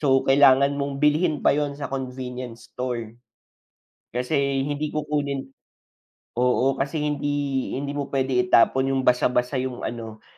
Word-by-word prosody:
so 135 -3 +3
kailangan 140 0 +5
mong 140 0 -2
bilhin 150 +1 +2
pa - - +6
'yon 145 -1 -1
sa 140 -2 -6
convenience 125 -2 -6
store. 120 -2 -5 0.9
Kasi 135 +1 0
hindi 145 +1 -2
kukunin 140 -3 -2 0.8
oo 125 +2 +2
kasi 140 +3 -1
hindi 145 -2 -1
hindi 140 +1 -4
mo 145 -1 -4
puwede 135 -1 0
itapon 130 +2 +3
'yong 135 -1 0
basa-basa 125 +1 +2
'yong 130 -1 -4
ano, 115 -2 -6
135 Hz, 135 wpm, -24 LUFS, 125-145 Hz, 0.9 s, pa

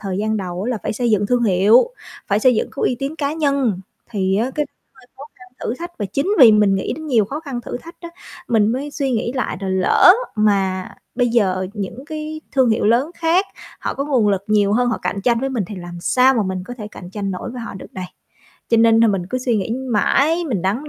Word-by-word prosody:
thời 195 -1 -4
gian 220 +1 0
đầu 185 -2 -4
á 245 - -2
là 230 - -2
phải - - -2
xây 240 +1 -1
dựng 205 -1 +2
thương 245 0 +1
hiệu, 210 - +4 0.4
phải 200 - +1
xây 250 0 +4
dựng - - -1
cái - - -3
uy 245 - +1
tín 280 +3 -4
cá 290 -1 -1
nhân, 275 - 0 0.3
thì 190 -3 0
á 235 +5 0
cái 300 -1 -1 0.3
hơi 260 -2 -20
khó 270 - -11
khăn 250 - -16
thử 235 - -2
thách. 345 +5 -7
Và 205 - -2
chính 275 - -2
vì 240 -6 +9
mình 210 -2 +4
nghĩ 190 - -2
đến 315 0 -8
nhiều 230 -7 +3
khó 285 +9 -5
khăn 270 -6 -5
thử 240 - -6
thách 335 +6 -12
á 340 - -8 0.4
mình 220 -3 +3
mới 280 +4 -3
suy 275 -3 -2
nghĩ 235 +1 -1
lại 255 -8 -2
là 195 - -3
lỡ 190 - +5 0.2
mà 195 -3 +1 0.3
bây 245 0 +1
giờ 190 -5 +1
những 220 +6 -6
cái 310 0 -6
thương 260 -4 +3
hiệu 220 - +1
lớn 245 +8 +2
khác 340 +4 +1 0.3
họ - - -3
có 275 - -2
nguồn 255 -8 +2
lực 200 -1 0
nhiều 205 -1 +2
hơn 245 +3 +2
họ 240 - -1
cạnh 200 - -2
tranh 235 -1 +2
với 270 - -1
mình 240 -7 -2
thì 205 +1 -8
làm 175 -1 -8
sao 255 +8 +3
mà 225 - +1
mình 185 -1 -3
có 245 - -7
thể 210 -2 -6
cạnh 180 -3 -11
tranh 200 -1 -4
nổi 185 +5 -5
với 245 0 -7
họ 230 - -7
được 190 - -11
đây. 185 -1 -5 0.6
Cho 230 - +3
nên 225 0 +5
nà 230 - +6
mình 190 -4 -1
cứ 255 - -1
suy 245 -3 0
nghĩ 200 +2 -2 0.2
mãi, 305 +10 +2
mình 200 -8 -1
đắn 230 +11 -1
230 Hz, 255 wpm, -19 LUFS, 200-265 Hz, 0.6 s, vì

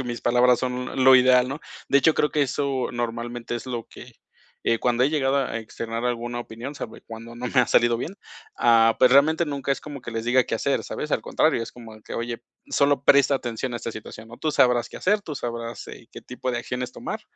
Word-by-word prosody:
que - - -3
mis 120 -1 -5
palabras 125 +1 +4
son 125 +1 -2
lo 130 0 +9
ideal, 125 0 +5
¿no? 140 +3 -5 0.3
De 140 - +5
hecho, 155 +3 +3
creo 150 - +1
que 150 - +1
eso 135 -1 -1
normalmente 120 0 -4
es 120 - -6
lo 120 -3 -4
que, - - -12 0.5
eh, 115 - +3
cuando 120 +1 +2
he 140 - +2
llegado 140 -3 +1
a 125 -4 -1
externar 115 +1 -5
alguna 120 0 -3
opinión 120 +5 -8
sabe - - -8
cuando, 115 +1 -9
no 125 - -4
me 130 +1 +3
ha 125 - +2
salido 120 -1 +3
bien. 170 +10 -5 0.4
Ah, 115 -1 +4
pues, 130 - +6
realmente 155 +5 +5
nunca 140 -3 -4
es - - -4
como 145 -2 -8
que 120 - -8
les 115 0 -4
diga 125 +1 +3
qué - - -3
hacer, 140 +5 0
¿sabes? 150 - -5
Al - - +2
contrario, 155 -7 +1
es 115 - -7
como 115 -3 -12
que - - -8
oye, 120 0 -4 0.3
solo 140 -1 +2
presta 140 0 +5
atención 120 -1 -3
a - - -1
esta 115 -1 -5
situación, 110 +1 -10
¿no? 120 - -12
Tú 155 - -1
sabrás 125 -4 +3
qué - - -10
hacer, 205 +3 +1
tú 160 -7 -7
sabrás, 115 -2 -5
eh, - - -11
qué - - -11
tipo 125 +1 -5
de 120 - -2
acciones 125 +1 -4
tomar, - - -5
125 Hz, 235 wpm, -24 LUFS, 120-135 Hz, 0.5 s, lo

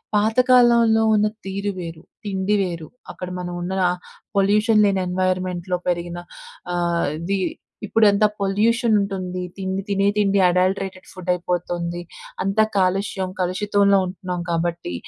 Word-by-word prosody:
పాతకాలంలో 235 0 +4
ఉన్న 210 0 +3 0.2
తీరు 200 +1 -2
వేరు, 165 -1 -7 0.2
తిండి 195 +1 0
వేరు, 170 -4 -3 0.2
అక్కడ 180 - -7
మనవున్న 175 +1 -4 0.6
పొల్యూషన్ 210 +2 +4
లేని 195 -2 +2
ఎన్వైర్‌మెంట్‌లో 185 -1 -1
పెరిగిన 175 0 -2 0.6
ఆహ్, 170 -1 0
అది 195 +3 -1 0.5
ఇప్పుడెంత 210 -1 +4 0.2
పొల్యూషనుంటుంది. 200 -3 +1 0.2
తిండి 190 0 -2
తినే 200 -1 +1
తిండి 200 -1 +3
అడల్టరేటెడ్ 185 +1 -1
ఫుడ్డయిపోతుంది. 175 -1 -2 0.4
అంతా 195 +3 +3
కాలుష్యం, 190 0 0
కలుషితంలో 200 +2 +2
ఉంటున్నాం 180 -1 -5
కాబట్టి, 170 - -2
190 Hz, 105 wpm, -22 LUFS, 180-205 Hz, 0.6 s, పాతకాలంలో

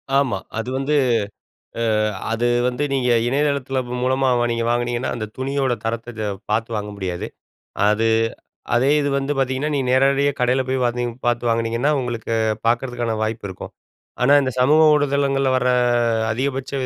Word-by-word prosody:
ஆமா. 135 -8 +2 0.2
அது 115 +2 -3
வந்து 135 +3 -1 1.0
அ - - +1 0.3
அது 115 +1 0 0.2
வந்து 125 +2 -1
நீங்க 130 -2 0 0.2
இணையதளத்தில 140 -1 0
ப்ப 125 +1 -4
மூலமா 130 +1 +1
வா - - +2
நீங்க 115 0 -1
வாங்குனீங்கன்னா, 120 +1 -1
அந்த 115 -3 -4
துணியோட 135 0 -1
தரத்தை 115 +1 -3
த - - -1 0.3
பார்த்து 110 +2 0
வாங்க 105 0 -4
முடியாது. 90 -3 -4 0.6
அது 110 +2 +2 0.7
அதே 130 +4 +3
இது 145 - 0
வந்து 140 +1 -2
பார்த்தீங்கன்னா, 135 +3 0
நீங்க 135 -3 -1
நேரடியா 140 +2 +3
கடையில 125 +1 +2
போய் 130 -1 0
பாத்திங் 120 0 -1
பாத்து 120 0 +1
வாங்கினீங்கன்னா, 115 +5 +1
உங்களுக்கு 120 -2 -3 0.3
பாக்குறதுக்கான 120 -1 0
வாய்ப்பு 110 -1 -3
இருக்கும். 95 - -9 0.5
ஆனா 130 +3 +5
இந்த 130 - -1
சமூக 150 +5 +5
ஊடுதளங்கள்ள 140 -2 +1
வர 125 - 0 0.3
அ 115 -2 +1
அதிகபட்ச 135 +3 -3
125 Hz, 155 wpm, -21 LUFS, 115-135 Hz, 1.0 s, ஆனா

